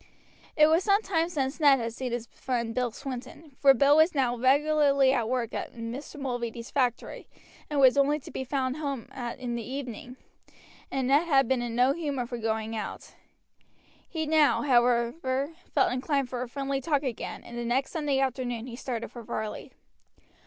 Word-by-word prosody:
It 305 - +8
was 320 +4 +3
some 405 +1 +3
time 335 -4 0
since 275 -3 -2
Ned 285 -3 +6
had 230 -1 -3
seen 250 +1 -4
his 240 -1 -3
friend 235 -2 -3
Bill 250 0 0
Swinton, 270 +5 -8
for 275 - +7
Bill 280 +4 +5
was 315 +1 +4
now 255 -3 +1
regularly 280 +1 +3
at 235 -4 0
work 245 -2 -1
in 230 0 -5
Mr. 290 +4 -8
Mulready's 240 -3 -4
factory 250 -4 -1 0.4
and 295 -2 0
was 265 0 +6
only 290 +2 +3
to - - -11
be - - -4
found 260 0 -2
at - - -8
home 275 -5 -3 0.3
in 250 -2 -4
the 235 - -3
evening, 255 -1 -6 0.7
and 265 -2 -1
Ned 290 +5 +3
had 275 -5 +4
been 260 -1 +1
in 235 -1 -4
no 250 +3 +4
humor 285 -6 -3
for 240 0 -6
going 220 0 -2
out. 215 - -6 1.0
He 320 -2 -2
now, 310 -1 +3
however, 260 +3 +1 0.2
felt - - +2
inclined 270 0 -1
for 245 -1 -4
a 250 - -4
friendly 275 +1 -2
talk 290 0 0
again, 255 -5 -5
and 240 - -10
the 240 - -3
next 245 +3 0
Sunday 295 -4 0
afternoon 250 -3 -2
he 245 -2 -7
started 235 -2 -4
for 240 - -9
Varley. 215 -1 -5
260 Hz, 185 wpm, -28 LUFS, 240-285 Hz, 1.0 s, It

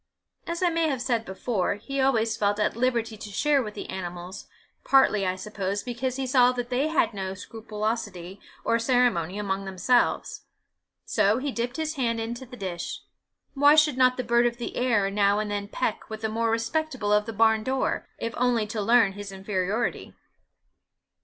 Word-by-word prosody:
As 340 +2 -2
I 355 - +4
may 330 -1 +1
have 270 -3 -1
said 235 -3 -1
before, 190 0 -1
he 275 +6 -3
always 230 -4 +2
felt 205 -1 0
at 210 - +1
liberty 235 -2 0
to 210 - -8
share 285 +7 +2
with 210 -4 -6
the - - -6
animals, 180 0 -6 0.4
partly, 215 -8 +4
I 185 - 0
suppose, 200 0 -3
because 250 +1 -3
he 270 0 -2
saw 250 -1 +5
they 250 +3 -1
had 315 -7 +1
no 190 -1 -4
scrupulosity 210 -3 -5 0.3
or 230 - +2
ceremony 230 -8 +1
amongst 195 -1 -2
themselves; 190 +6 +1 0.6
so 205 +3 +2
he 280 +2 -2
dipped 245 +1 -3
his 315 -1 -3
hand 230 -3 0
into 235 +3 -5
the 250 +1 -11
dish: 185 -5 -5 0.5
why 285 +2 +6
should 300 -3 +4
not 255 -1 +4
the 255 - -1
bird 235 0 +3
of 235 0 -3
the 240 - -5
air 220 -6 +1
now 200 0 +3
and 210 0 -2
then 200 0 -3
peck 210 +1 -3
with 220 0 -6
the 220 - -1
more 230 +1 0
respectable 230 -1 -1
of 210 +1 +2
the - - -3
barn 220 0 +3
door, 260 +2 -1
if 230 0 -4
only 240 -3 +2
to 215 0 -4
learn 225 -1 +4
his 205 0 -8
inferiority? 195 +3 -2
225 Hz, 180 wpm, -26 LUFS, 205-250 Hz, 0.6 s, why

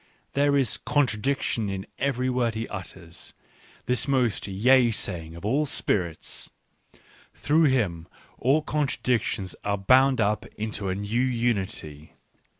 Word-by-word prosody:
There 140 0 +3
is 135 -4 +1
contradiction 130 -4 0
in 95 0 -4
every 130 -1 0
word 125 -3 0
that - - -14
he 115 +1 -3
utters, 90 -4 -9 0.5
this 125 +2 +1
most 125 -7 +1
yea 120 +6 +4
saying 85 -7 -3
of 85 - -9
all 140 +7 +1
spirits. 85 - -1 0.9
Through 155 +2 +3
him 100 - 0 0.3
all 140 +5 +2
contradictions 125 -9 -1
ardl 100 -1 -2
bound 130 +2 +5
up 105 0 0
into 105 -2 -3
a 95 - -1
new 105 +4 -1
unity. 105 - -2
115 Hz, 130 wpm, -26 LUFS, 95-130 Hz, 0.9 s, bound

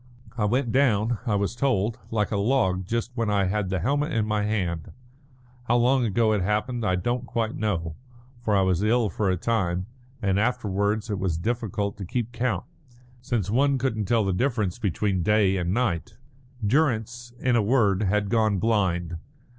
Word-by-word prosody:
I 110 -4 0
went 120 +3 +1
down, 115 -4 +2
I 105 - +2
was 100 +3 -1
told, 120 -4 0
like 105 -2 0
a - - 0
log 100 -5 +1
just 115 +3 -2
when 115 -3 -1
I 100 -2 +2
had 95 0 -1
the 95 - 0
helmet 145 - 0
in 110 -3 +1
my 105 -1 0
hand. 90 -7 -2 0.7
How 120 - +2
long 125 +1 +3
ago 110 +1 +2
it 105 - +1
happened 105 +5 -1
I 95 -3 +2
don't 120 +7 -2
quite 115 -2 -2
know, 85 -7 -2 0.5
for 110 -3 +1
I 95 - +4
was 95 -1 +1
ill 110 0 +2
for 105 -3 0
a 90 - +1
time, 90 -3 0 0.3
and 95 -1 +1
afterwards 105 -1 0
it 100 - -2
was 95 -4 -1
difficult 105 0 -2
to 100 - -6
keep 120 +4 -3
count, 120 0 -1 0.6
since 110 -6 -2
one 140 +3 +3
couldn't 120 -5 -1
tell 115 0 +2
the 95 - 0
difference 110 -3 0
between 100 -2 0
day 100 +1 +3
and 90 -1 -1
night." 100 -7 -1 0.5
Durrance, 120 -2 0
in 125 -2 +1
a 115 - +4
word, 105 -3 +2
had 105 0 +1
gone 110 -3 +2
blind. 90 -5 0
105 Hz, 180 wpm, -25 LUFS, 95-120 Hz, 0.7 s, I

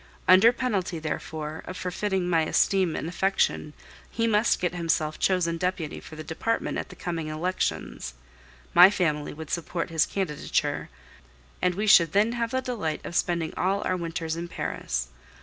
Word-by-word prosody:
Under 190 +6 +8
penalty, 210 -9 -2
therefore, 155 0 -5
of 185 - -6
forfeiting 185 0 -1
my 165 -2 +3
esteem 190 -4 +2
and - - -3
affection, 180 -4 0 0.4
he 230 - -1
must 220 0 +3
get 180 -1 -1
himself 165 -3 -1
chosen 175 -3 +1
deputy 180 -4 -2
for 155 - -11
the 155 - -7
department 230 +9 -2
at - - -6
the - - -11
coming 165 -3 -4
elections; 155 - -3 0.6
my 180 +2 +10
family 155 -7 -1
would 160 0 -8
support 170 0 -3
his 160 -2 +2
candidature, 185 -7 -2 0.7
and 180 -1 +2
we 210 +3 -1
should 170 -6 +6
then 210 +3 +3
have 235 -1 -1
the 260 +2 -1
delight 205 -12 -3
of 170 - -6
spending 170 -2 0
all 195 +2 0
our 185 - 0
winters 165 -2 -3
in 170 +1 -5
Paris. 60 - -3
175 Hz, 165 wpm, -26 LUFS, 160-195 Hz, 0.7 s, my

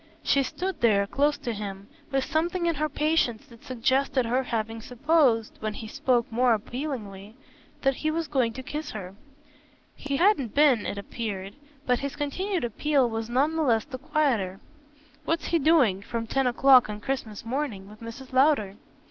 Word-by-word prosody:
She 280 - +3
stood 370 +8 -4
there 205 -4 +4
close 290 +7 +1
to 235 - -4
him, 200 -1 -6 0.2
with 270 -1 +1
something 345 +3 0
in 335 - +2
her 305 0 -1
patience 300 -6 0
that 235 -1 -17
suggested 260 +1 +1
her 245 +3 +1
having 225 -2 -3
supposed, 250 -2 +2
when 215 -1 -3
he 220 - -7
spoke 250 -2 0
more 240 0 +3
appealingly, 215 -4 -6 0.5
that 270 -1 +2
he 310 - -1
was 325 0 -2
going 260 -5 +1
to 260 +3 -7
kiss 300 +4 -5
her. 190 -3 -7 0.8
He 280 -1 -3
hadn't 315 - +2
been, 280 -7 +4
it 200 - -4
appeared; 200 -2 -5 0.3
but 250 -1 +2
his 280 0 -4
continued 360 +5 -2
appeal 265 +3 +1
was 225 0 -3
none 280 +6 +1
the 320 - 0
less 230 -7 +2
the 265 -3 -8
quieter. 265 - 0 0.7
"What's 330 +1 -1
he 335 - +2
doing, 270 - +4
from 230 +2 -4
ten 270 +3 0
o'clock 255 -1 +5
on 210 0 -5
Christmas 225 -3 -4
morning, 235 -6 -3
with 215 +2 -14
Mrs. 250 +3 -9
Lowder?" 260 -8 +3
255 Hz, 175 wpm, -26 LUFS, 220-295 Hz, 0.8 s, o'clock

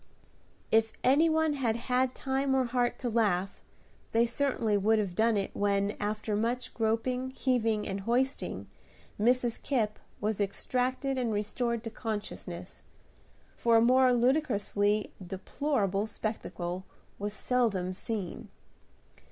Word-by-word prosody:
If 225 0 +3
any 290 +6 +5
one 315 -1 +2
had 245 -6 0
had 250 +2 0
time 270 0 0
or 260 -1 +3
heart 245 0 0
to 250 - -3
laugh, 200 -5 0 0.5
they 230 +1 +5
certainly 235 -4 0
would 215 +2 +3
have 200 -4 -1
done 220 +3 +3
it 195 - -1
when, 200 0 +1
after 210 0 -2
much 240 +4 -1
groping, 235 +3 0
heaving, 230 -5 0
and 195 0 -3
hoisting. 245 +6 -1 0.5
Mrs. 240 +1 +2
Kipp 220 -6 0 0.2
was 210 0 -1
extricated 255 +6 -1
and 240 -3 0
restored 230 +3 -1
to 225 - -5
consciousness; 205 -6 -6 0.7
for 235 -1 +3
a - - +5
more 255 +2 +5
ludicrously 220 -5 +1
deplorable 200 +2 -1
spectacle 190 -5 -4 0.4
was 205 +1 -2
seldom 215 -7 0
seen. 200 -2 -5
225 Hz, 125 wpm, -30 LUFS, 205-255 Hz, 0.7 s, any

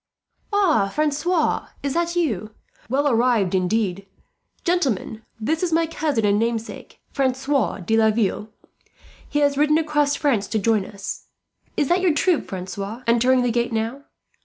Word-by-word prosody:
"Ah, 360 - +3
Francois, 305 - 0 0.2
is 280 -1 -1
that 340 +1 -1
you? 220 - -1 0.3
Well 280 +4 +1
arrived, 235 -6 +2
indeed! 190 0 0 0.6
"Gentlemen, 265 - 0 0.2
this 310 +9 -1
is 360 -2 0
my 330 +1 +3
cousin 305 -8 -1
and 205 0 +3
namesake, 230 0 -4
Francois 265 -6 0
de 220 +6 0
Laville. 220 -1 +1 0.8
He 295 - 0
has 285 -1 +2
ridden 300 +1 +4
across 295 -2 +1
France 235 -9 0
to 220 - -1
join 215 -1 +1
us. 200 -1 -7 0.5
Is 290 - +2
that 355 +1 +3
your 350 -5 +2
troop, 355 -1 +1
Francois, 195 +5 -6
entering 250 +2 +3
the 245 - +1
gate 240 +1 0
now? 230 +5 -3
250 Hz, 145 wpm, -22 LUFS, 215-300 Hz, 0.8 s, ridden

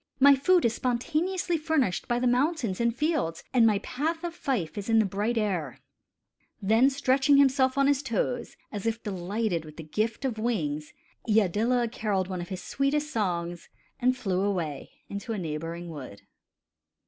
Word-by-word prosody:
My 280 +1 +8
food 345 +5 +3
is 230 - +2
spontaneously 330 +9 -1
furnished 300 - 0
by 240 -2 +1
the 250 - 0
mountains 250 - +1
and 235 0 +3
fields, 295 - -1
and 235 -3 +6
my 210 -2 +3
path 305 - -3
of 345 -1 -3
fife 255 - -2
is 205 +1 -5
in 225 - +4
the 220 - +5
bright 205 +5 -1
air." 180 - -1 0.8
Then 225 +7 +4
stretching 275 +1 +3
himself 265 -1 +4
on 275 - +4
his 280 -1 +3
toes, 245 -1 -2
as 205 0 -4
if 225 +1 -2
delighted 195 -2 -2
with 155 -1 -12
the 165 - -7
gift 215 - -2
of 235 -5 -2
wings, 155 -11 -2 0.4
Iadilla 220 +4 +2
carolled 195 -5 -1
one 185 -2 -3
of 175 - -7
his 185 -1 -5
sweetest 295 +6 0
songs 175 -5 -2 0.3
and 255 0 +2
flew 190 -6 -1
away 175 -8 -2 0.2
into 200 +3 -5
a - - -3
neighboring 165 0 -4
wood. 135 -11 -9
225 Hz, 170 wpm, -27 LUFS, 185-270 Hz, 0.8 s, My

